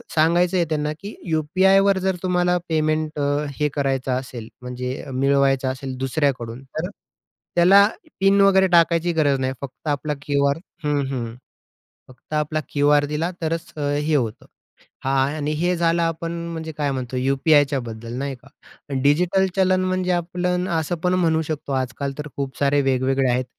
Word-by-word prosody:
सांगायचंय 170 +3 +3
त्यांना 150 -1 -1
की 205 +2 -7
यू-पी-आयवर 190 +5 +3
जर 190 0 0
तुम्हाला 180 -1 +2
पेमेंट 155 -1 0
अ, 145 +1 0
हे 150 0 +2
करायचं 135 -2 0
असेल, 120 -3 -9
म्हणजे 125 +2 -5
मिळवायचं 135 0 +2
असेल 130 0 -6
दुसऱ्याकडून, 130 -3 -1
तर 155 +6 -5 0.7
त्याला 195 +4 +7 0.3
पिन 195 +1 +4
वगैरे 190 -1 +5
टाकायची 170 -1 +3
गरज 145 -4 +2
नाही, 130 0 -1
फक्त 140 +3 -9
आपला 150 +1 -1
क्यू-आर 140 0 +1 0.3
हं, 145 -1 +1
हं, 115 -3 -4 0.7
फक्त 130 +4 -14
आपला 150 +1 0
क्यू-आर 145 0 +3
दिला 150 +4 -2
तरच 165 +1 -3
हे 145 +1 0
होतं. 115 -6 -1 0.6
हां 135 0 +2
आणि 150 -1 -2
हे 180 +2 +1
झालं 170 0 +2
आपण 165 0 -2 0.2
म्हणजे 160 -1 -5
काय 145 -2 0
म्हणतो 130 -1 -4
यू-पी-आयच्याबद्दल 135 -4 +1
नाही 140 0 -3
का? 125 +2 -20 0.6
डिजिटल 180 +6 +3
चलन 185 -1 +3
म्हणजे 185 0 0
आपण 180 +1 -1
असं 165 0 -1
पण 180 0 +2
म्हणू 165 -3 +2
शकतो 155 -2 -5
आजकाल 130 +1 -2
तर 150 0 -5
खूप 135 -2 -4
सारे 140 0 +3
वेगवेगळे 135 0 +1
आहेत 125 +1 0
150 Hz, 150 wpm, -22 LUFS, 135-170 Hz, 0.7 s, त्याला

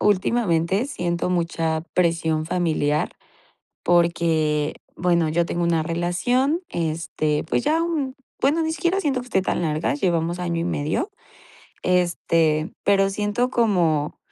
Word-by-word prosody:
últimamente 195 0 +2
siento 175 - -2
mucha 165 -2 0
presión 165 -3 +1
familiar 155 -4 0 0.7
porque, 165 -3 +2 0.2
bueno, 170 -2 +2
yo 170 +1 +1
tengo 175 - -2
una 170 -2 +2
relación, 175 - 0
este, 155 -2 -1
pues - - 0
ya 315 +3 +2
un, 305 -6 -2 0.3
bueno, 300 +5 +2
ni 320 0 -1
siquiera 350 +3 0
siento 275 -8 0
que 245 - -10
esté 190 -5 +1
tan 185 - -1
larga, 155 - 0
llevamos 175 - 0
año 170 -1 -1
y - - -1
medio, 170 - -1 0.7
este, 165 -3 +1
pero 195 -1 +3
siento 210 +5 0
como 175 - +1
175 Hz, 130 wpm, -23 LUFS, 160-215 Hz, 0.7 s, pero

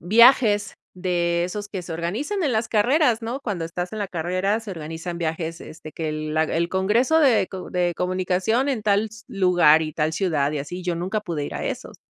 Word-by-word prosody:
viajes 215 +1 +5 0.2
de 175 -2 0
esos 205 +3 -5
que 190 -3 -5
se 170 - -7
organizan 215 - -2
en 285 -6 +1
las 220 0 0
carreras, 240 +2 +3
¿no? 235 +4 -3
Cuando 200 -10 -3
estás 175 +2 -5
en 215 - -5
la 200 - -2
carrera 185 +4 -1
se 220 -3 -7
organizan 165 +1 -6
viajes, 165 0 -3
este, 155 -1 -10
que 160 -1 -4
el, 155 0 -4
la 160 - +3
el 170 +2 -1
Congreso 220 +12 +2
de 255 -10 +4
co 185 -1 -8
de 180 -1 +1
comunicación 185 +8 0
en 250 -6 -1
tal 205 +1 +2 0.2
lugar, 175 -5 +4
y 155 -1 -4
tal 155 +1 0
ciudad, 155 -6 0
y 150 - -2
así 175 +6 -6
yo 175 -1 -1
nunca 185 +5 -2
pude 170 -8 -4
ir - - -6
a - - -4
esos. - - -5
180 Hz, 210 wpm, -23 LUFS, 165-215 Hz, 0.2 s, viajes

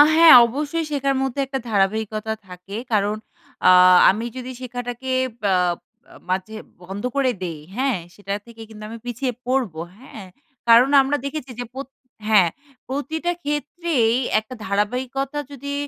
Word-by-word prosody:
হ্যাঁ 330 0 +9
অবশ্যই 300 +6 -3
শেখার 275 -1 0
মধ্যে 270 0 -2
একটা 270 0 -4
ধারাবাহিকতা 215 +2 0
থাকে 180 +3 -9
কারণ 210 0 +1 0.5
আ - - +9 0.4
আমি 215 +5 0
যদি 255 0 -6
শেখাটাকে 245 +1 -5 0.4
আ - - +4 0.8
মাঝে 190 +4 -2 0.3
বন্ধ 195 +4 -7
করে 270 -2 +2
দেই 165 -4 -5 0.2
হ্যাঁ? 260 -3 +1 0.2
সেটা 200 -1 -5
থেকে 230 -1 -13
কিন্তু 215 -1 -11
আমি 230 - -7
পিছিয়ে 245 +2 -2 0.2
পড়বো, 235 -12 -1 0.2
হ্যাঁ? 225 -5 -11 0.4
কারণ 235 +3 +7
আমরা 275 +2 0
দেখেছি 280 -2 -5
যে 245 - -3
প্র 265 - -7 0.5
হ্যাঁ 200 -6 +5 0.4
প্রতিটা 315 +6 -2
ক্ষেত্রেই 295 -5 0 0.2
একটা 220 +4 -10
ধারাবাহিকতা 250 +8 -2
যদি 280 +1 -6
245 Hz, 135 wpm, -22 LUFS, 210-275 Hz, 0.8 s, হ্যাঁ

